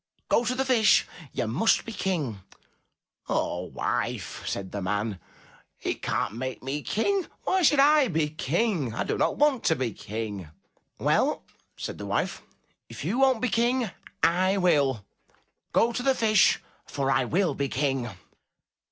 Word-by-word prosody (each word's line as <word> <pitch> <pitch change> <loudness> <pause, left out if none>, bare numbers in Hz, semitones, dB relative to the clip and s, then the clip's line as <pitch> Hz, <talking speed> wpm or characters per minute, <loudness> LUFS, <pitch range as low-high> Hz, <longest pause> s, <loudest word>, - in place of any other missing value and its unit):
Go 235 - +3
to 250 - 0
the 265 +1 0
Fish. 235 -5 +4 0.3
You - - -2
must 130 - +2
be 230 - -6
King. 155 - -2 0.9
"Ah, - - 0
wife, - - -3
said 95 -1 -3
the 100 - -4
man, 105 +1 -2 0.6
"he - - -2
can*t 105 - -2
make 130 0 -5
me 140 +3 -3
King. 375 - 0 0.2
Why 375 0 +1
should 295 -4 +4
I 290 0 +6
be 160 -6 +1
King? 160 - -1
I - - 0
do - - -2
not - - 0
want 285 -4 +3
to 160 - +4
be 125 -6 -2
King. 105 -5 -6 0.5
"Well, - - +1 0.3
said - - -6
the - - -6
wife, - - -1 0.5
"if - - -7
you 215 +10 0
won*t 265 -3 +4
be 255 - +1
King, 235 +1 +1 0.3
I 185 +3 +3
will; 140 - +2 0.7
go 235 - +3
to 245 - -2
the 265 +1 +2
Fish, 215 -4 +4 0.3
for 135 -1 -1
I 130 - +3
will 180 +7 +1
be 140 -1 -2
King. 135 -3 -1
170 Hz, 160 wpm, -27 LUFS, -, 0.9 s, I